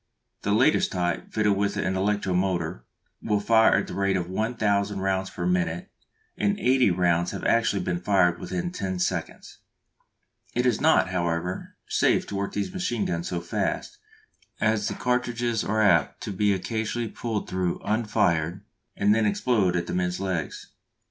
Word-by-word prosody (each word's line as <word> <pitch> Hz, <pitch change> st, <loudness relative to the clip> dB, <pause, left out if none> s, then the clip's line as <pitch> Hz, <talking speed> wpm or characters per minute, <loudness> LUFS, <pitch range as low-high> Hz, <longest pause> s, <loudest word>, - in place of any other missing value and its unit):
The 100 Hz, -, -1 dB
latest 130 Hz, +9 st, +3 dB
type, 90 Hz, -2 st, -2 dB
fitted 105 Hz, -2 st, +2 dB
with 100 Hz, 0 st, -1 dB
an 95 Hz, -, 0 dB
electro 100 Hz, 0 st, 0 dB
motor, 90 Hz, -9 st, -1 dB, 0.4 s
will 105 Hz, -1 st, +1 dB
fire 110 Hz, +2 st, +4 dB
at -, -, +1 dB
the -, -, -8 dB
rate 100 Hz, -1 st, +1 dB
of 85 Hz, -2 st, -3 dB
one 110 Hz, +6 st, -2 dB
thousand 100 Hz, -2 st, 0 dB
rounds 95 Hz, 0 st, 0 dB
per -, -, -5 dB
minute, 180 Hz, +1 st, -1 dB, 0.4 s
and 205 Hz, 0 st, 0 dB
eighty 130 Hz, -2 st, +4 dB
rounds 85 Hz, -1 st, +2 dB
have -, -, -6 dB
actually 115 Hz, -5 st, +2 dB
been 85 Hz, 0 st, -1 dB
fired 90 Hz, -2 st, +3 dB
within 175 Hz, -1 st, -3 dB
ten 95 Hz, -, -3 dB
seconds! 90 Hz, -, -3 dB, 1.0 s
It 125 Hz, +1 st, +1 dB
is 120 Hz, -4 st, +2 dB
not, 160 Hz, -10 st, +4 dB
however, 90 Hz, 0 st, -2 dB
safe -, -, +2 dB
to 100 Hz, -, -4 dB
work 100 Hz, 0 st, -2 dB
these 105 Hz, -, -3 dB
machine 150 Hz, -, -1 dB
guns 85 Hz, 0 st, -2 dB
so 90 Hz, -2 st, -3 dB
fast, 85 Hz, -, -3 dB, 0.6 s
as 110 Hz, -1 st, +1 dB
the 100 Hz, -, -3 dB
cartridges 120 Hz, -2 st, 0 dB
are 110 Hz, +1 st, +1 dB
apt 85 Hz, -8 st, +3 dB
to -, -, -4 dB
be 100 Hz, +2 st, +1 dB
occasionally 110 Hz, +4 st, -2 dB
pulled 110 Hz, -1 st, -4 dB
through 90 Hz, -2 st, -1 dB
unfired 95 Hz, -5 st, 0 dB, 0.3 s
and 105 Hz, +1 st, +4 dB
then 110 Hz, -1 st, +2 dB
explode 105 Hz, -4 st, +1 dB
among 85 Hz, -1 st, 0 dB
the -, -, -5 dB
men's 90 Hz, 0 st, -1 dB
legs. 90 Hz, -6 st, -4 dB
100 Hz, 170 wpm, -26 LUFS, 90-115 Hz, 1.0 s, fire